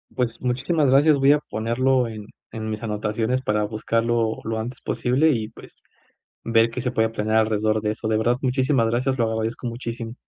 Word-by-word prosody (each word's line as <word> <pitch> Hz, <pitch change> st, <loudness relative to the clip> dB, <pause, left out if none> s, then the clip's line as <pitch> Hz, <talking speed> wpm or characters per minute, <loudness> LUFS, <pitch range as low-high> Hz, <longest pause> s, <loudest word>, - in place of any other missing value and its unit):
Pues 120 Hz, -2 st, -2 dB
muchísimas 135 Hz, +4 st, +1 dB
gracias 145 Hz, +3 st, +5 dB
voy 135 Hz, +1 st, +5 dB
a 150 Hz, -, +2 dB
ponerlo 125 Hz, +1 st, 0 dB
en 110 Hz, -2 st, -8 dB, 0.3 s
en 110 Hz, -1 st, -4 dB
mis 110 Hz, +1 st, -4 dB
anotaciones 110 Hz, +3 st, -1 dB
para 105 Hz, -4 st, 0 dB
buscarlo 115 Hz, +1 st, 0 dB
lo 110 Hz, 0 st, -2 dB
antes 120 Hz, +3 st, -5 dB
posible 130 Hz, +6 st, +1 dB
y 110 Hz, -4 st, -2 dB
pues -, -, -16 dB, 0.6 s
ver 115 Hz, 0 st, +3 dB
qué 125 Hz, -, -5 dB
se 125 Hz, +1 st, -2 dB
puede 110 Hz, -2 st, +2 dB
planear 110 Hz, 0 st, 0 dB
alrededor 110 Hz, 0 st, +1 dB
de 105 Hz, -, 0 dB
eso 110 Hz, +1 st, -5 dB
de 110 Hz, -, +1 dB
verdad 120 Hz, +2 st, +2 dB
muchísimas 130 Hz, -2 st, +1 dB
gracias 130 Hz, +3 st, 0 dB
lo 115 Hz, -, +2 dB
agradezco 110 Hz, +2 st, -3 dB
muchísimo. 115 Hz, -1 st, -5 dB
115 Hz, 185 wpm, -23 LUFS, 110-125 Hz, 0.6 s, gracias